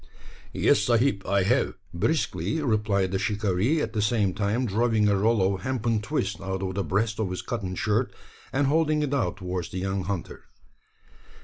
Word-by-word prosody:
"Yes, - - +3
sahib, 120 -2 +2
I 100 0 +2
have," 120 +8 +1 0.2
briskly 155 - 0
replied 105 -8 +1
the 95 - 0
shikaree, 105 - +1
at 110 - -4
the 110 - 0
same 105 -3 +1
time 105 +5 0
drawing 110 0 +2
a 100 - +3
roll 100 -1 +2
of 95 - -5
hempen 120 -3 0
twist 105 -6 -2
out 95 0 -3
of 95 -1 -2
the 100 +1 -1
breast 105 +5 0
of 105 -4 0
his 90 - -4
cotton 100 -6 -3
shirt, 110 +5 0 0.4
and 140 +2 +1
holding 155 +1 +2
it 145 -1 -2
out 105 -11 0
towards 90 -3 -4
the - - -6
young 95 0 -2
hunter. 100 -5 -5
105 Hz, 180 wpm, -26 LUFS, 95-120 Hz, 0.4 s, Yes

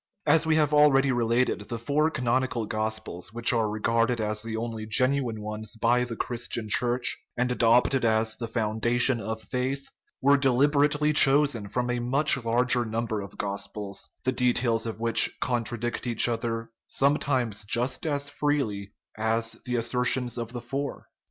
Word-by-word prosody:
As 160 0 +3
we 160 - +3
have 150 -1 +2
already 140 -2 +5
related, 120 -3 0
the 115 - -3
four 145 +7 +1
canonical 130 -3 -1
gospels 110 -4 -4
which 115 +1 +1
are 110 -2 +1
regarded 115 +3 0
as 105 0 -2
the 110 0 -5
only 110 -1 -5
genuine 125 0 +1
ones 105 +1 -5
by 120 +2 +2
the 120 -1 -6
Christian 120 -2 -2
Church, 120 +3 0 0.2
and 125 +1 0
adopted 125 +2 +3
as 110 -1 +1
the 115 +1 -5
foundation 115 +2 0
of 110 +2 -5
faith, 135 +2 -3 0.3
were 140 +1 +4
deliberately 145 +3 +2
chosen 140 -7 +4
from 125 +3 -1
a 120 - -1
much 135 +6 +3
larger 125 +1 +2
num 115 +1 -2
ber 110 -3 -3
of 100 -2 -10
gospels, 100 0 -6
the 130 - +1
details 120 -2 +1
of 110 -1 -6
which 115 0 +4
contradict 120 0 -2
each 120 -1 +3
other 115 -1 -3 0.2
sometimes 130 -6 0
just 125 +7 -1
as 145 -1 -1
freely 135 -10 -2 0.2
as 115 +1 0
the 125 -1 -2
assertions 125 +1 0
of 115 -1 -5
the 120 -1 -6
four. 135 +3 -5
120 Hz, 160 wpm, -26 LUFS, 110-130 Hz, 0.3 s, already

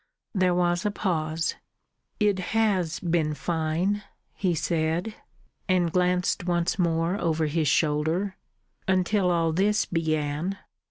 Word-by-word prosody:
There 185 -3 +2
was 175 0 +1
a 210 - +1
pause. 165 -5 -1 0.7
"It 205 -3 +2 0.2
has 185 -7 +1
been 165 -3 0
fine," 165 +6 -1 0.3
he 180 -4 0
said; 165 +5 -1 0.6
and 180 -2 +2
glanced 180 0 +1
once 175 +2 0
more 170 +2 +1
over 160 -1 +1
his 155 0 0
shoulder. 160 +7 +1 0.5
"Until 185 +1 +2
all 165 -2 +2
this 205 +5 +2
began." 160 +2 -1
175 Hz, 115 wpm, -26 LUFS, 160-185 Hz, 0.7 s, There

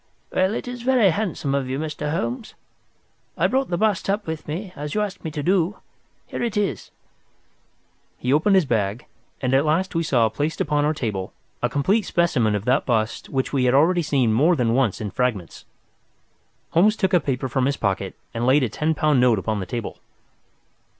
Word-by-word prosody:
"Well, 190 +4 +2
it - - -5
is 245 -1 -6
very 245 -6 +4
handsome 165 -7 -2
of 135 -2 -1
you, 130 - -2
Mr. 150 0 -4
Holmes. 220 - -3 0.8
I - - +2
brought 265 0 +1
the 175 - -1
bust 210 -1 0
up 205 +2 0
with 160 -1 -5
me, 180 +5 -5
as 150 +3 -5
you 210 - +2
asked 200 -1 -4
me 160 - -3
to 150 -1 -5
do. 185 +3 +1 0.5
Here - - -6
it 230 -3 -1
is!" 205 -1 -1 1.3
He 125 +2 0
opened 180 +7 +3
his 185 -4 +4
bag, 110 -2 -1 0.4
and 130 -1 0
at 135 +1 +4
last 165 +5 0
we 165 - +1
saw 125 -8 +2
placed 145 +8 -3
upon 145 -1 +1
our 155 +1 +1
table 105 -9 -3 0.3
a 120 - +1
complete 190 - +1
specimen 125 -11 +2
of 105 +1 -3
that 130 +3 +2
bust 110 -3 -1
which 135 0 -2
we 130 -2 +2
had 125 +1 +3
already 170 +5 +4
seen 135 -8 +1
more 155 +10 +4
than 120 -5 +1
once 120 -6 +1
in 105 -2 -4
fragments. 115 -10 -2 1.1
Holmes 205 +6 +4
took 190 -3 0
a 180 - +6
paper 130 -3 -2
from 130 +1 0
his 140 - -1
pocket 95 -2 -2 0.2
and 120 +1 -1
laid 135 +2 +4
a 125 - 0
ten 155 +8 -1
pound 150 -4 +2
note 125 -3 +4
upon 105 +2 -2
the 95 - -5
table. 115 -3 -5
145 Hz, 200 wpm, -23 LUFS, 125-185 Hz, 1.3 s, a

